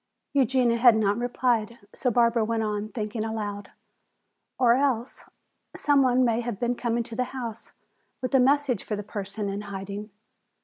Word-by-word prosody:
Eugenia 255 -3 +3
had 235 -1 +6
not 205 -2 +2
replied, 240 -1 0 0.2
so 255 - 0
Barbara 235 -1 +3
went 225 0 -1
on 210 0 -2
thinking 215 0 -4
aloud. 205 -2 -4 0.9
"Or 240 -2 +5
else 260 -2 -1 0.5
some 285 -2 +3
one 255 -1 +3
may 230 0 +1
have 235 -4 -4
been 240 0 +1
coming 235 -1 -1
to 225 - -8
the 250 +1 0
house 230 -3 -6 0.5
with 255 +1 -4
a 265 - +6
message 270 -3 +2
for 215 - -3
the 205 - -5
person 205 0 -5
in 200 +1 -3
hiding. 200 +1 -6
230 Hz, 165 wpm, -26 LUFS, 210-250 Hz, 0.9 s, had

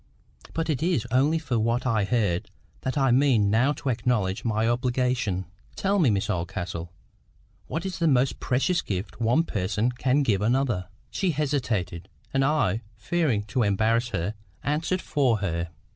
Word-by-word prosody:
But 165 -1 -1
it 150 -5 -1
is 170 -8 +1
only 140 +6 +3
for 130 -8 -1
what 115 +4 0
I 110 -5 +2
heard 100 -6 0 0.3
that 130 +3 -2
I 135 -2 +3
mean 120 -6 +4
now 120 +6 +3
to 140 -1 -4
acknowledge 115 -5 0
my 110 -1 +1
obligation. 125 -5 0 0.3
Tell 200 +1 +1
me, 155 -8 +4
Miss 100 -2 +1
Oldcastle,—what 85 - -6
is 190 - -4
the 165 - +2
most 130 -2 +2
precious 150 +7 +1
gift 100 +4 -5
one 120 +8 +3
person 105 - -1
can 130 +3 +1
give 105 -7 +1
another?" 120 -5 +1 0.2
She 190 - 0
hesitated; 125 - -1 0.2
and 135 0 +3
I, 135 -8 +1
fearing 120 -1 0
to 130 - +2
embarrass 110 +3 +2
her, 95 0 -2 0.3
answered 160 +5 -1
for 130 -6 +2
her. 85 -4 -2
120 Hz, 155 wpm, -26 LUFS, 105-140 Hz, 0.3 s, mean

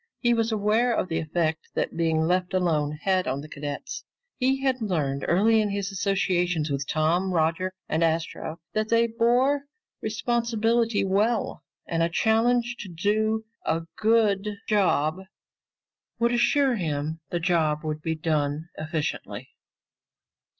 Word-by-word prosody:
He 240 -1 +3
was 230 -1 +1
aware 220 +3 +2
of 185 - -1
the 165 - 0
effect 160 0 -1
that - - -1
being 165 -1 +1
left 180 +2 +1
alone 155 -5 +1
had 185 -1 +1
on 135 +2 -1
the 150 - -9
cadets. 145 - -6 0.4
He 265 +1 +1
had 260 -2 +1
learned 150 -9 -1
early 220 +5 +4
in 210 - 0
his 200 0 -2
associations 180 -5 0
with 140 0 -2
Tom, 170 +5 +1
Roger, 170 +2 +1 0.2
and 160 +1 +1
Astro 165 0 -1
that 215 0 -1
they 230 0 +4
bore 245 +5 +2 0.4
responsibility 230 -1 +1
well, 210 +4 0 0.2
and 165 0 -1
a 165 - +2
challenge 235 +5 +2
to 200 - -7
do 215 +5 0 0.2
a 165 +1 0
good 215 -2 +2 0.2
job 180 -6 +2 1.0
would 235 0 +2
assure 255 +1 +3
him 155 -2 -2
the 175 - -1
job 160 -3 +1
would 155 -1 -3
be 160 +1 -1
done 155 0 -1
efficiently. 155 -1 -4
185 Hz, 140 wpm, -26 LUFS, 160-225 Hz, 1.0 s, early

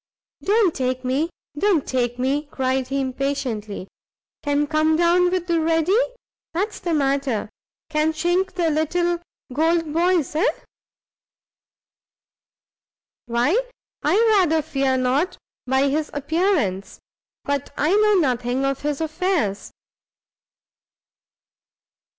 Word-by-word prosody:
"Don't 405 -4 +3
take 255 -1 -2
me, 275 +6 0 0.3
don't 345 -2 +2
take 245 -2 -1
me," 275 +4 0
cried 260 -1 -1
he, 275 +1 -1
impatiently; 260 -7 -3 0.5
"can 290 0 +1
come 310 +1 +2
down 345 +2 +4
with 365 -1 -1
the 340 -2 +1
ready, 325 +3 +2 0.6
that's 410 +5 -1
the 345 - -3
matter; 275 -7 0 0.4
can 305 +1 +2
chink 350 +4 0
the 345 -3 +1
little 345 +3 0 0.3
gold 325 +1 +1
boys? 340 -3 +2
eh?" 320 - +2 2.8
"Why 240 - +2 0.5
I - - +2 0.2
rather 320 -4 +2
fear 275 -3 0
not 260 +8 0 0.3
by 265 +2 +3
his 300 +2 -1
appearance; 290 - 0 0.4
but 285 -2 -2
I 305 +5 +2
know 425 0 +4
nothing 255 -5 +1
of 275 -1 -1
his 295 0 -2
affairs." 315 - -1
300 Hz, 110 wpm, -22 LUFS, 265-340 Hz, 2.8 s, down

